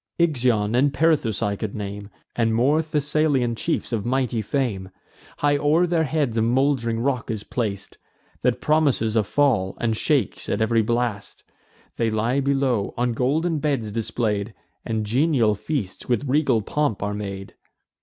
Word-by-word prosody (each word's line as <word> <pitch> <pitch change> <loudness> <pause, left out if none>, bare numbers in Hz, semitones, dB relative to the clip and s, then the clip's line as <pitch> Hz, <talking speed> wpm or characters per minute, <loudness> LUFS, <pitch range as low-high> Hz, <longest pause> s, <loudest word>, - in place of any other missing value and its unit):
Ixion 125 -10 +1
and 135 +4 +3
Perithous 140 -8 +1
I 100 -1 0
could 105 0 -5
name, 100 -1 -6 0.3
And 115 -1 +1
more 140 +7 +3
Thessalian 150 -4 +1
chiefs 125 +1 -2
of 110 -3 -1
mighty 125 -1 0
fame. 105 -6 -2 0.5
High 145 0 +2
o'er 155 +5 +3
their 165 -2 +1
heads 145 -6 -1
a - - +3
mould'ring 120 -1 +1
rock 125 0 -1
is 110 -3 -3
plac'd, 100 -5 -4 0.4
That 125 0 +1
promises 140 -8 +2
a 110 - +4
fall, 105 -4 +1
and 115 -2 0
shakes 135 -1 0
at - - 0
ev'ry 110 +1 +2
blast. 115 -2 -2 0.5
They 115 -1 +1
lie 115 +5 0
below, 135 -6 0
on 120 0 0
golden 155 +7 0
beds 135 -8 -1
display'd; 110 -1 -2 0.3
And 110 -1 -2
genial 125 -1 +2
feasts 105 -2 -4
with 120 +2 +1
regal 130 -5 +2
pomp 145 -5 -1
are 105 0 -2
made. 100 -2 -6
120 Hz, 155 wpm, -23 LUFS, 110-145 Hz, 0.5 s, a